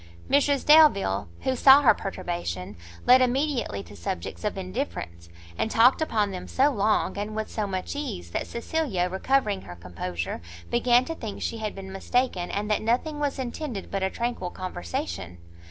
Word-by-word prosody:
Mrs 285 0 +3
Delvile, 285 - +5
who 260 - 0
saw 270 +3 +7
her 245 - +7
perturbation, 170 - -4 0.3
led 255 +1 +7
immediately 255 - 0
to 100 - -13
subjects 85 - -5
of 210 -2 -2
indifference, 185 - -5 0.3
and - - +1
talked 240 +7 +5
upon 215 -9 +1
them 185 -1 -6
so 275 +3 +3
long, 210 -3 +1
and 210 +1 -4
with 220 0 -3
so 215 -2 -2
much 190 +6 -4
ease, 90 - -5
that - - -3
Cecilia, 235 - -1
recovering 205 0 +1
her 90 - -10
composure, 85 0 -5 0.3
began 240 +1 +4
to 325 - -4
think 225 -10 -6
she 230 - -3
had 215 -1 -4
been 190 -1 -8
mistaken, 195 -2 -1
and 205 +1 -2
that 210 - +2
nothing 255 +7 0
was 285 -2 -1
intended 255 -4 -5
but 195 - -1
a 190 - +1
tranquil 235 -5 -3
conversation. 90 - -5
215 Hz, 170 wpm, -26 LUFS, 180-260 Hz, 0.3 s, saw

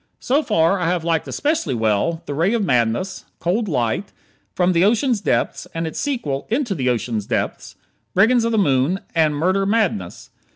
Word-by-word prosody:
So 275 +4 +1
far 165 - +2
I 175 - 0
have 175 -1 0
liked 165 -2 0
especially 290 - -1
well 110 +9 0
"The 145 - -4
Ray 170 +10 +1
of 215 -4 0
Madness," 125 +8 0
"Cold 205 +6 -1
Light," 125 - -1 0.4
"From 180 0 +2
the 170 +1 +3
Ocean 235 +6 +3
Depths" 205 -3 -1
and 165 0 -2
its 160 - -5
sequel 155 - -2
"Into 240 -2 0
the 130 -7 -1
Ocean's 115 -3 -2
Depths," - - -3 0.4
"Brigands 225 +5 +4
of 230 - 0
the 225 - +1
Moon," 150 0 +2
and 155 -3 +2
"Murder 185 +6 +1
Madness." 190 - -1
175 Hz, 175 wpm, -20 LUFS, 140-215 Hz, 0.4 s, Brigands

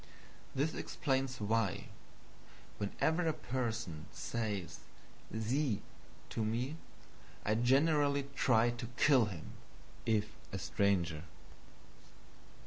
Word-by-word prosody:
This 145 +4 +1
explains 135 -2 -1
why, 105 -2 0 0.9
whenever 160 - +1
a 160 - +3
person 115 - -3
says 105 -6 -3 0.5
SIE 115 +1 +1 0.5
to 110 - -1
me, 120 +8 -1 0.7
I 105 - +3
generally 140 +4 +4
try 120 -3 +4
to 120 0 -5
kill 135 -6 +6
him, 90 -7 -6 0.6
if 105 -2 +2 0.2
a 95 - -2
stranger. 90 -4 +1
115 Hz, 90 wpm, -35 LUFS, 105-135 Hz, 0.9 s, kill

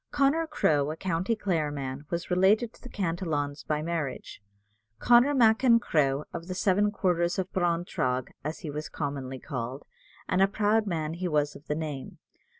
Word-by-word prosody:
Connor 290 +4 +2
Crowe, 150 - +2
a 155 - -3
county 185 +5 -1
Clare 170 -8 0
man, 140 0 -5
was 170 +1 -3
related 205 +6 +3
to - - -20
the 250 - -10
Cantillons 165 -7 -2
by 150 0 -1
marriage. 160 -10 -4 0.6
"Connor 245 - +5
Mac 225 -1 +4
in 235 -3 +6
Cruagh, 145 - +1
of 170 0 -6
the 185 - -4
seven 200 +2 +2
quarters 175 -4 0
of 190 -1 -3
Breintragh," 165 -8 0
as 155 +3 -4
he 155 - -5
was 150 +1 -5
commonly 140 -3 -4
called, 130 +1 -5 0.4
and 185 0 +1
a 195 - +6
proud 215 +2 +1
man 160 -4 -2
he 180 +2 -3
was 150 -3 0
of 145 - -14
the 150 - -1
name. 150 -4 -5
170 Hz, 175 wpm, -28 LUFS, 145-200 Hz, 0.6 s, in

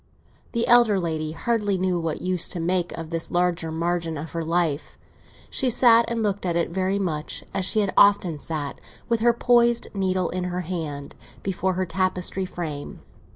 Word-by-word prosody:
The 235 -1 +1
elder 235 -5 +5
lady 155 -3 -3
hardly 205 +2 0
knew 185 -1 0
what 165 -2 -3
use 185 -2 +2
to 175 - -3
make 175 +1 0
of 165 0 -7
this 165 0 -2
larger 175 -2 0
margin 165 0 -2
of 155 +3 -7
her 165 -1 -3
life; 165 -2 -1 0.5
she 265 - +1
sat 235 -1 +5
and 230 -1 -2
looked 205 -1 -1
at 175 -2 -1
it 170 0 0
very 190 +2 0
much 160 -6 -3
as 190 - 0
she 215 - +3
had 200 -2 -1
often 190 -6 +4
sat, 150 -2 -5 0.3
with 230 -1 +1
her 235 +2 +4
poised 235 0 +2
needle 185 -2 0
in 180 0 -2
her 180 0 -2
hand, 155 -5 -5 0.3
before 190 -1 -1
her 185 +1 -1
tapestry 185 +1 -1
frame. 155 -6 -6
180 Hz, 180 wpm, -24 LUFS, 165-200 Hz, 0.5 s, elder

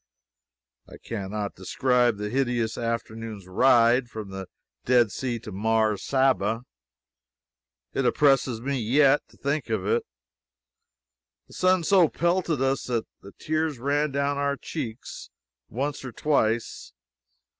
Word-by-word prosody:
I - - -11
can 100 -4 -6
not 105 -1 -3
describe 120 +4 +1
the 105 0 -4
hideous 120 -3 0
afternoon's 115 -3 -4
ride 120 +5 +4
from 110 -3 -7
the 95 -1 -6 0.4
Dead 120 -4 +3
Sea 125 0 -3
to 110 - -9
Mars 110 +1 +1
Saba. 120 -4 +1 1.3
It 135 - 0
oppresses 135 -5 +2
me 135 +1 -2
yet, 135 +5 +4
to - - -21
think 140 -2 -2
of 110 -4 -1
it. 110 +3 +1 1.4
The - - -18
sun 185 -1 +2
so 175 -1 +4
pelted 170 -5 0
us 135 0 0
that 120 -3 -1 0.2
the 100 - -13
tears 155 -2 -1
ran 145 +4 0
down 140 +1 -1
our 140 0 0
cheeks 115 -1 -7 0.4
once 140 +4 -3
or 130 - -6
twice. 115 -6 -1
125 Hz, 130 wpm, -26 LUFS, 110-140 Hz, 1.4 s, ride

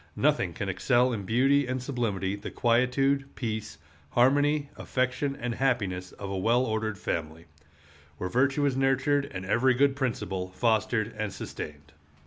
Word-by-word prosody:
Nothing - - +1
can - - -4
excel 125 +1 +2
in 100 -4 -4
beauty 135 +5 +3
and 130 0 -1
sublimity 115 -7 -2
the 100 - -7
quietude, 135 +3 +2
peace, 110 -3 -4 0.3
harmony, 145 - +3
affection, 130 +2 -1
and 120 0 -2
happiness 100 -9 -1
of 100 - -7
a 95 - -2
well 120 +6 +3
ordered 110 -2 -2
family, 80 -1 -4 0.7
where 90 - -3
virtue 135 +7 +2
is 135 -2 +1
nurtured 135 +2 +2
and 90 -1 -6
every 120 +6 +3
good 140 +1 +3
principle 100 -8 -2
fostered 110 0 +1
and 105 -2 -1
sustained. 75 -3 -8
120 Hz, 145 wpm, -28 LUFS, 100-135 Hz, 0.7 s, beauty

